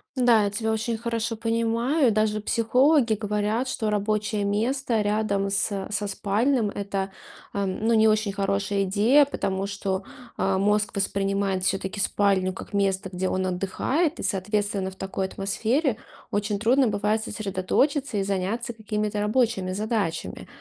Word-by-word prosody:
Да, 240 -4 +4
я - - +1
тебя 220 +2 -2
очень 220 +1 -1
хорошо 230 0 -2
понимаю. 230 +5 +1
Даже 215 0 +1
психологи 250 +3 +3
говорят, 210 +3 -1
что 220 -4 -1
рабочее 210 0 0
место 230 +3 0
рядом 205 -1 0
с 195 0 -1
со 205 0 -1
спальным- 215 +4 +1
это, 195 -1 -3 0.4
ам, 200 +1 -2
ну, 230 - +3
не 220 -1 +5
очень 215 -2 +2
хорошая 200 0 0
идея, 220 +10 +4
потому 195 -8 -2
что, 195 -1 -3 0.3
а, 195 -1 +1
мозг 210 +2 +1
воспринимает 195 -1 0
всё-таки 190 +1 -1
спальню 195 -2 +2
как 190 - -10
место, 195 -1 0
где 185 +1 -1
он 185 0 -1
отдыхает. 225 - -1
И, - - -4
соответственно, 205 0 -1
в 190 - -13
такой 190 0 -3
атмосфере 225 - 0 0.3
очень 205 0 -1
трудно 245 +5 +3
бывает 210 +1 0
сосредоточиться 215 +6 0
и 195 - +1
заняться 200 +5 -2
какими-то 210 -1 -2
рабочими 210 -3 +1
задачами. 205 -4 -2
210 Hz, 145 wpm, -25 LUFS, 195-225 Hz, 0.4 s, не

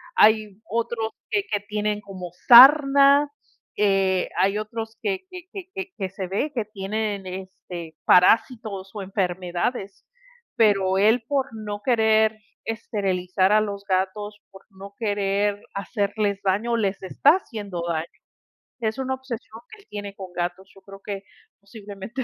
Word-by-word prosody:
hay 215 -2 +4
otros 225 0 -2 0.2
que 405 - +1
que 205 - +1
tienen 210 0 -2
como 190 -3 -8 0.2
sarna, 280 +2 +8 0.5
eh, 195 -2 +2
hay 195 +2 +2
otros 220 +1 -5
que 385 -2 -2
que 365 -2 -9 0.3
que 385 -1 -6
que 190 -3 -3
se 190 0 -6
ve 205 +11 -2
que 230 -4 -2
tienen, 205 0 -3
este, 180 -3 -8
parásitos 200 0 +3
o 210 - -5
enfermedades, 190 +2 -3 0.5
pero 195 -5 +3
él 220 +4 +4
por 275 -2 0
no 210 -2 -6
querer 220 -2 +3 0.3
esterilizar 190 -4 -1
a 215 0 +5
los 200 -2 -4
gatos, 205 +3 -1
por 195 0 -15
no 200 0 -12
querer 205 -1 0
hacerles 200 0 -1
daño, 210 +5 +1
les 200 -3 -1
está 230 +9 +4
haciendo 205 - -6
daño, 160 -1 -1 0.7
es 220 -1 -2
una 265 0 -1
obsesión 240 -4 -8
que 435 - -13
él - - -28
tiene 205 -1 -7
con 190 -2 -9
gatos, 180 +2 -4
yo 195 - -18
creo 195 0 -13
que 200 -1 -5 0.4
posiblemente 205 +3 -8
205 Hz, 140 wpm, -24 LUFS, 195-225 Hz, 0.7 s, sarna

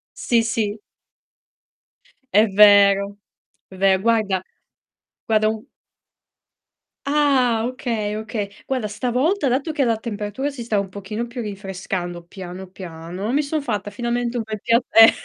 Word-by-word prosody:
Sì, 230 -2 +2
sì. 220 -2 -1 1.6
È 215 +2 +6
vero, 200 0 +6 0.5
è 190 - -13
ver 190 0 +3
guarda 215 -4 +2 0.8
guarda 215 -1 +3
un 220 0 -3 1.4
Ah, 270 -6 +2
okay, 230 -4 -3
okay. 215 -1 -4 0.2
Guarda, 255 -5 -1
stavolta 255 - 0
dato 270 +5 0
che 290 - +1
la 230 -3 +2
temperatura 215 +4 -4
si 275 -4 -7
sta 220 -3 0
un 200 - -2
pochino 205 +4 -5
più 240 +1 -6
rinfrescando 190 -4 -5
piano, 185 +1 -9
piano, 180 +3 -6
mi 290 - +3
son 300 +1 -2
fatta 210 -6 -3
finalmente 240 0 -2
un 230 - -1
bel 215 -1 -6
pia 230 +2 +3
eh, 225 0 +9
215 Hz, 135 wpm, -22 LUFS, 200-240 Hz, 1.6 s, eh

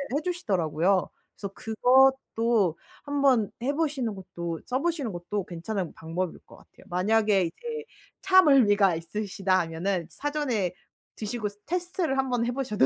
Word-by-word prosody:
해 295 - +1
주시더라고요. 190 - +1 0.3
그래서 200 -1 -7
그것도 235 -5 +3 0.3
한번 275 -7 +2
해보시는 280 -4 0
것도 170 -3 -6
써보시는 280 -1 -1
것도 175 +3 -3
괜찮은 180 +1 -4
방법일 165 +2 -4
것 - - -16
같아요. - - -20
만약에 205 +2 +3
이제 460 - -5 0.4
차멀미가 265 - +5
있으시다 190 +2 -1
하면은 170 +2 -1
사전에 265 - -1 0.4
드시고 215 0 -3 0.2
테스트를 350 -4 -1
한 265 0 0
번 245 -2 +1
해보셔도. 245 - +1
215 Hz, 320 characters per minute, -27 LUFS, 185-270 Hz, 0.4 s, 차멀미가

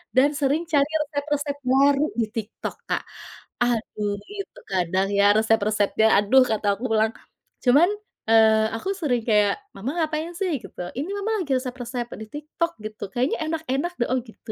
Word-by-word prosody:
dan 265 +3 +6
sering 290 +4 +1
cari 285 0 +3
resep-resep 290 -1 -2
baru 275 +2 +4 0.2
di 230 - +3
TikTok 220 0 -5
Kak, - - 0 0.6
aduh 215 -3 -1 0.2
itu 480 +5 -7
kadang 185 +1 +1
ya 200 0 +5
resep-resepnya 220 -1 +2
aduh 210 +6 +5
kata 220 -1 -1
aku 245 - -5
ulang, 220 0 +3 0.5
cuman, 280 +7 +6 0.4
eee, 220 -1 +5
aku 225 +12 -4
sering 265 -10 0
kayak, 210 - +3 0.2
"Mama 220 +8 -3
ngapain 315 +1 -2
sih?" 385 -1 -1
Gitu, - - -9 0.2
"ini 295 +7 -3
mama 410 +2 -2
lagi 285 - -6
resep-resep 245 -1 -4
di - - -5
TikTok 305 +3 -3
gitu 215 0 -7
kayaknya 250 +3 +1
enak-enak 320 +1 -2
do" - - +4
oh 260 - +2
gitu. 225 -1 -11
255 Hz, 155 wpm, -24 LUFS, 220-295 Hz, 0.6 s, dan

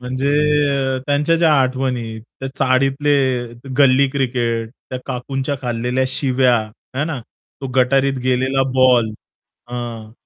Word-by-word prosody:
म्हणजे 130 +2 -2 0.8
त्यांच्या 145 +3 +2
ज्या 165 -2 +4
आठवणी, 130 -3 -1 0.2
त्या 135 - -3
चाळीतले, 135 -1 +2 0.3
गल्ली 140 0 +5
क्रिकेट, 120 -4 -1 0.2
त्या 130 - -3
काकूंच्या 135 +3 -3
खालेल्या 125 +2 -1
शिव्या 130 -2 +2
आहे 120 +6 -6
ना, 150 -6 -4 0.4
तो 135 - -4
गटारीत 135 +1 +2
गेलेला 130 +1 +1
बॉल. 125 -4 +4 0.6
हं. 115 -3 -6
130 Hz, 110 wpm, -19 LUFS, 125-135 Hz, 0.8 s, गल्ली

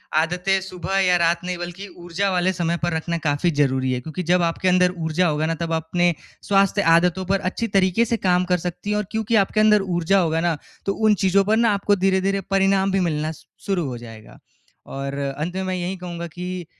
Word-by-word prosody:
आदतें 180 +4 +1
सुबह 190 0 -4
या 180 -2 +3
रात 170 0 +2
नहीं 180 0 -3
बल्कि 175 +3 -7
ऊर्जा 175 +3 -2
वाले 180 0 +1
समय 170 -1 -1
पर 175 -1 0
रखना 170 +1 -2
काफ़ी 155 +2 0
ज़रूरी 130 -2 +1
है, 125 - -2
क्योंकि 160 +6 -5
जब 180 +2 +2
आपके 170 +2 -1
अंदर 180 0 +3
ऊर्जा 165 +2 0
होगा 155 -1 0
ना 165 +1 -1
तब 165 -1 -2
अपने 170 +2 +1 0.3
स्वास्थ्य 200 0 +3
आदतों 180 +2 +1
पर 195 +2 +1
अच्छी 230 +4 -3
तरीके 190 +4 +3
से 230 +1 -1
काम 180 0 +3
कर 180 - +4
सकती 180 +3 -5
है। 210 - +1
और 210 - -1
क्योंकि 220 0 -1
आपके 215 - -2
अंदर 210 -1 +5
ऊर्जा 175 +3 +2
होगा 165 -2 +1
ना 170 -2 0 0.3
तो 195 - 0
उन 215 0 +3
चीज़ों 195 +1 +4
पर 215 +2 +2
ना 230 -1 +3
आपको 205 0 +1
धीरे-धीरे 195 +1 +1
परिणाम 195 0 +2
भी 195 - +1
मिलना 155 0 -2
शु 160 - -14 0.2
शुरू 190 -5 0
हो 125 -2 -5
जाएगा। 115 -2 -12 0.5
और 135 0 -5 0.2
अंत 165 +5 -4
में 190 - -2
मैं 185 0 -2
यही 180 +1 -3
कहूँगा 175 -1 -6
कि 180 +1 -6
180 Hz, 220 wpm, -22 LUFS, 165-195 Hz, 0.5 s, अंदर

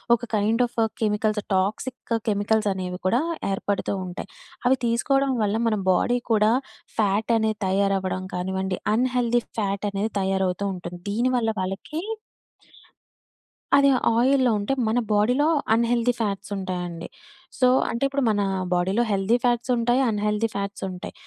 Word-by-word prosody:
ఒక 230 - -9
kind 220 +4 +2
of 235 - -27 0.2
chemicals 210 0 +1
toxic 220 +5 -1
chemicals 205 +1 +1
అనేవి 180 -1 -5
కూడా 240 +8 +2 0.3
ఏర్పడుతూ 200 +1 -1
ఉంటాయి. 180 - -7 0.4
అవి 260 +1 +4
తీసుకోవడం 270 +4 +1
వల్ల 205 +1 0
మన 220 - +2 0.2
బాడీ 245 +7 +2
కూడా 215 0 +4 0.5
ఫ్యాట్ 210 +1 +1
అనేది 220 -1 0
తయారవ్వడం 190 -1 0
కానివ్వండి, 190 +1 -2 0.2
అన్ 250 +3 +2
హెల్టీ 240 -1 +2 0.2
ఫ్యాట్ 200 0 -1
అనేది 205 +2 -2
తయారవుతూ 190 0 0
ఉంటుంది. 175 0 -8
దీని 235 +5 +1
వల్ల 225 -2 +1
వాళ్ళకి 195 - -4 1.8
అది 280 0 +5 0.3
ఆయిల్‌లో 255 0 +3
ఉంటే, 205 +7 -1
మన 225 +3 +2
బాడీలో 250 +8 +3 0.3
అన్ 230 - +3
హెల్టీ 240 0 +2
ఫ్యాట్స్ 205 -2 -3
ఉంటాయండి. 180 -3 -4 0.5
సో, 255 - +5 0.2
అంటే 235 - -2
ఇప్పుడు 275 0 -1
మన 205 -1 +1 0.3
బాడీలో 190 +6 +1
హెల్తీ 200 +4 +2
ఫ్యాట్స్ 240 0 +1
ఉంటాయి, 240 +3 +2
అన్ 210 - -1
హెల్టీ 210 +2 +1
ఫ్యాట్స్ 200 0 -4
ఉంటాయి. 180 -1 -7
210 Hz, 140 wpm, -24 LUFS, 195-240 Hz, 1.8 s, అది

